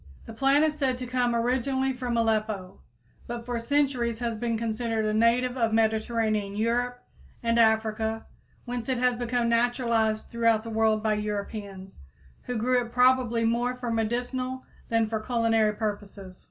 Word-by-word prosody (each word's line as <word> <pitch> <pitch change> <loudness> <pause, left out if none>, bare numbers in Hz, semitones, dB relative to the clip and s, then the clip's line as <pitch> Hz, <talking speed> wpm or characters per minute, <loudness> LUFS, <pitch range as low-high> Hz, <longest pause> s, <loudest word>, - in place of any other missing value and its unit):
The 225 - -9
plant 275 +5 +3
is 305 -1 0
said 265 -4 0
to 250 - -5
come 245 -1 0
originally 260 +3 0
from 250 -2 -2
Aleppo, 215 -4 -1 0.5
but 235 -1 -5
for 240 -1 -2
centuries 250 -2 0
has 235 -1 -2
been 230 +1 -1
considered 225 0 -1
a 215 - 0
native 235 +3 +2
of 230 -2 +1
Mediterranean 220 -2 +1
Europe 245 +3 -1 0.4
and 230 0 +2
Africa, 220 0 +1 0.4
whence 245 -1 -4
it 260 - +1
has 250 0 +2
become 240 0 -1
naturalized 235 -2 +1
throughout 230 -2 +2
the 230 - -7
world 220 -1 +2
by 215 -1 +2
Europeans, 205 -2 -5 0.5
who 245 - -3
grew 250 +2 +2
it 235 - -10
probably 250 -2 +3
more 240 +2 0
for 250 -2 -4
medicinal 245 +3 -2 0.2
than 230 -1 +2
for 220 0 -2
culinary 225 -2 +1
purposes. 205 -3 -5
230 Hz, 155 wpm, -27 LUFS, 220-245 Hz, 0.5 s, plant